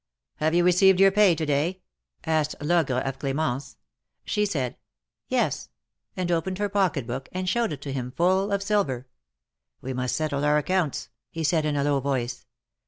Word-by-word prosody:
'^Have 160 +2 +2
you 175 - +4
received 180 +1 +5
your 195 0 +7
pay 200 -3 +5
to 160 0 -2
day?'^ 155 +6 0 0.5
asked 155 -2 +1
Logre 145 -5 +1
of 135 0 -4
Cl^mence. 140 -1 -2 0.5
She 210 -1 +1
said 135 -10 -2 0.5
^^Yes," - - 0 0.5
and 180 -1 -1
opened 175 +3 0
her 205 0 -1
pocket 190 - +1
book, 130 +3 -5
and 185 0 -3
showed 230 +1 +1
it 140 -2 -6
to 140 - -4
him, 125 -2 -3
full 185 +8 +1
of 200 0 0
silver. 195 - 0 0.7
We 130 - -5
must 125 0 -1
settle 145 -2 -1
our 150 0 +4
accounts," 170 -1 -1 0.2
he 165 - -5
said, 160 0 +2
in 150 -1 0
a 140 - +1
low 145 -1 +2
voice. 130 -3 -3
155 Hz, 175 wpm, -25 LUFS, 140-185 Hz, 0.7 s, your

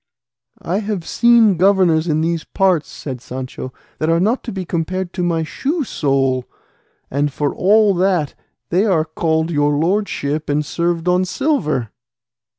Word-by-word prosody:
"I 185 +4 -1
have 200 -5 -4
seen 235 -5 +4
governors 180 -3 +3
in 155 -1 +1
these 165 0 -1
parts," 185 -5 +1
said 130 -4 -7
Sancho, 130 0 -7 0.3
"that 155 - 0
are 165 0 +3
not 220 +8 +1
to 235 - -4
be 190 -2 -5
compared 175 +2 -3
to 185 - -3
my 170 -2 0
shoe 290 - -2
sole; 135 - 0 0.6
and 145 +2 0
for 145 +2 -1
all 210 +2 +4
that 180 -5 +1 0.4
they 180 +4 +3
are 165 -6 +2
called 160 0 -1
'your 145 -1 +2
lordship' 155 -4 -1
and 150 +1 0
served 170 +2 -1
on 180 +1 +3
silver." 185 - -1
170 Hz, 155 wpm, -18 LUFS, 150-190 Hz, 0.6 s, seen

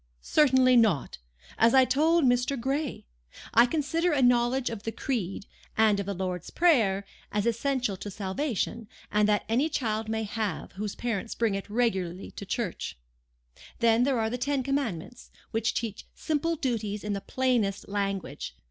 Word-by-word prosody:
"Certainly 260 -4 +4
not. 200 - +2 0.4
As 230 +3 +5
I 260 -1 +7
told 310 +5 +3
Mr. 245 +2 +2
Gray. 275 +3 -2 0.5
I 235 +2 +7
consider 325 +5 0
a 275 -3 +2
knowledge 245 +1 +3
of 225 -3 -6
the 225 - -3
Creed, 205 -7 -3 0.3
and 215 -2 +4
of 200 - -3
the 200 - -2
Lord's 180 -1 -3
Prayer, 220 - +3 0.3
as 205 0 0
essential 240 -2 0
to 205 - -6
salvation; 215 +3 -3 0.2
and 210 0 +3
that 205 -1 +2
any 255 +8 +2
child 220 -6 -2
may 220 0 -1
have, 215 -1 -3
whose 205 +1 -5
parents 230 -2 -3
bring 230 -3 +1
it 195 0 -4
regularly 195 -6 -1
to 200 - -9
church. 205 - -3 0.8
Then 230 0 +4
there 260 -1 +2
are 220 0 0
the 250 - -3
Ten 280 +1 0
Commandments, 245 - -3 0.2
which 225 0 0
teach 220 -3 -4
simple 325 +2 -1
duties 220 -7 -2
in 210 -1 -2
the 200 - -3
plainest 235 -4 0
language. 195 - -3
230 Hz, 160 wpm, -28 LUFS, 205-260 Hz, 0.8 s, I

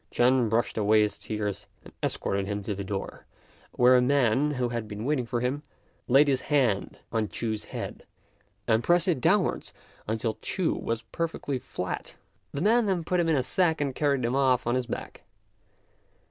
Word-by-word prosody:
Ch'ên 125 -1 +3
brushed 115 0 0
away 105 +1 +4
his 105 - -2
tears 105 -2 -4 0.2
and - - -13
escorted 100 0 -1
him 100 0 -3
to 105 - -2
the 100 0 -5
door, 95 0 -5 0.5
where 125 +1 +5
a 125 - +5
man, 135 +1 +3
who 125 -4 -1
had 115 -2 -3
been 105 +1 -6
waiting 135 -4 0
for 120 0 -1
him, 130 +4 -1 0.5
laid 135 +4 +6
his 135 -2 +2
hand 125 -10 +1
on 110 -2 0
Ch'u's 110 -2 -3
head - - -7 0.6
and 115 0 +3
pressed 175 +1 +3
it 165 -8 +1
downwards 185 +3 +1 0.3
until 110 +1 -2
Ch'u 180 -4 0
was 115 0 -3
perfectly 160 -5 -2
flat. 90 -6 -5 0.4
The 140 - -4
man 225 +2 +4
then 185 -4 0
put 180 +2 0
him 170 -1 +2
in 160 - +3
a 130 - +1
sack 160 +4 +1
and 140 -2 -1
carried 140 -3 +1
him 120 +2 0
off 130 -2 +3
on 120 - +1
his 125 -1 -1
back. - - -6
125 Hz, 185 wpm, -27 LUFS, 110-145 Hz, 0.6 s, laid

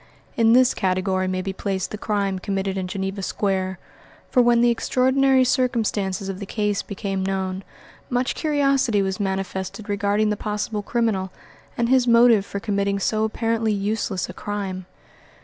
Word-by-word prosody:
In 225 -1 +4
this 255 +1 +5
category 185 -1 0
may 185 0 -2
be 195 0 -3
placed 190 -1 -3
the - - -3
crime 200 -3 -1
committed 195 0 -2
in 190 -1 -3
Geneva 195 +1 -4
Square; 190 -1 -1 0.5
for 250 - +5
when 240 -1 +4
the 240 0 +5
extraordinary 260 +2 +3
circumstances 220 -7 0
of 195 -1 -5
the 200 - -6
case 210 -1 -1
became 195 -1 -4
known, 190 0 -2 0.5
much 250 0 0
curiosity 275 -8 +1
was 190 -1 -2
manifested 190 +1 -3
regarding 205 +1 +1
the - - 0
possible 210 0 -3
criminal 205 -4 -1 0.5
and 235 - +1
his 255 0 +3
motive 235 -3 +5
for 200 - -4
committing 200 -1 0
so 215 +2 0
apparently 225 0 0
useless 200 -2 -2
a - - -8
crime. 195 -3 -5
205 Hz, 155 wpm, -23 LUFS, 190-230 Hz, 0.5 s, this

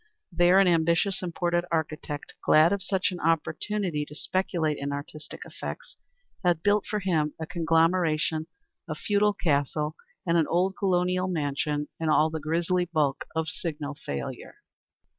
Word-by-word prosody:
There 175 +2 +5
an 195 - +5
ambitious 170 +3 +2
imported 175 -1 0
architect, 155 -2 -3
glad 160 +4 +5
of 200 - -2
such 190 -1 0
an 180 - -6
opportunity 165 +1 0
to 150 - -12
speculate 165 -3 -1
in 140 0 -3
artistic 145 +2 -7
effects, - - -7 0.5
had 175 -3 +2
built 205 0 +2
for 210 -1 -2
him 160 -5 0
a 160 - -3
conglomeration 165 -1 +1 0.4
of - - -4
a - - -14
feudal 210 0 +2
castle 150 -2 0 0.3
and 170 -1 +3
an 160 - +2
old 185 +3 +1
colonial 185 -1 +1
mansion 150 -3 -1
in 160 -1 0
all 155 +1 +4
the 160 - -3
grisly 170 +4 0
bulk 155 -5 0
of 160 0 0
signal 150 -3 -4
failure. 70 - -6
165 Hz, 150 wpm, -27 LUFS, 155-180 Hz, 0.5 s, There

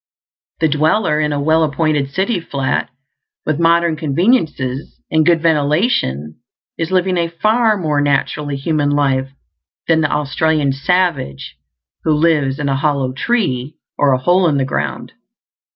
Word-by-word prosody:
The 160 - +4
dweller 155 +3 +1
in 150 -1 0
a 145 - -1
well 160 +3 +2
appointed 150 -2 0
city 190 - -1
flat, 140 -5 -2 0.6
with 155 0 -1
modern 170 0 +3
conveniences 155 - -1
and 160 0 +3
good 165 0 +2
ventilation, 145 - 0 0.4
is 165 0 -3
living 185 0 +1
a 170 -1 +1
far 215 +6 +1
more 150 -5 0
naturally 145 0 -1
human 145 0 0
life 135 -2 +1 0.6
than 160 -1 +3
the 155 - 0
Australian 150 0 0
savage 140 - -1 0.5
who 160 - +2
lives 150 -4 +1
in 145 - -3
a 135 - +1
hollow 140 -3 0
tree 140 - -1 0.2
or 145 -1 +2
a - - +2
hole 175 +7 +2
in 145 -3 +1
the 135 - 0
ground. - - -4
155 Hz, 145 wpm, -17 LUFS, 140-170 Hz, 0.6 s, The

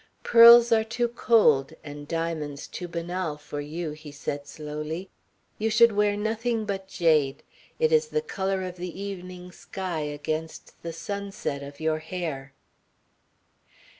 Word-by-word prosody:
"Pearls 235 0 +9
are 220 -1 +5
too 240 +2 -1
cold 220 - +3
and 145 0 -9
diamonds 155 -3 -3
too 180 - -6
banal 170 -1 -3
for 145 0 -7
you," 155 +2 -4
he 150 0 -10
said 145 0 -5
slowly. 155 +4 -6 0.5
"You 220 +1 +1
should 225 +2 +6
wear 205 0 +2
nothing 220 +1 -1
but 195 -2 -4
jade. 155 -7 +2 0.3
It 475 0 +2
is 470 0 +4
the 460 0 -1
colour 195 - -2
of 180 -1 -6
the 180 +1 -6
evening 180 -2 -7
sky 185 -2 -5
against 155 +2 -5
the 170 - -5
sunset 195 -3 -4
of 140 0 -10
your 160 0 0
hair." 155 -5 -5
175 Hz, 140 wpm, -26 LUFS, 150-205 Hz, 0.5 s, Pearls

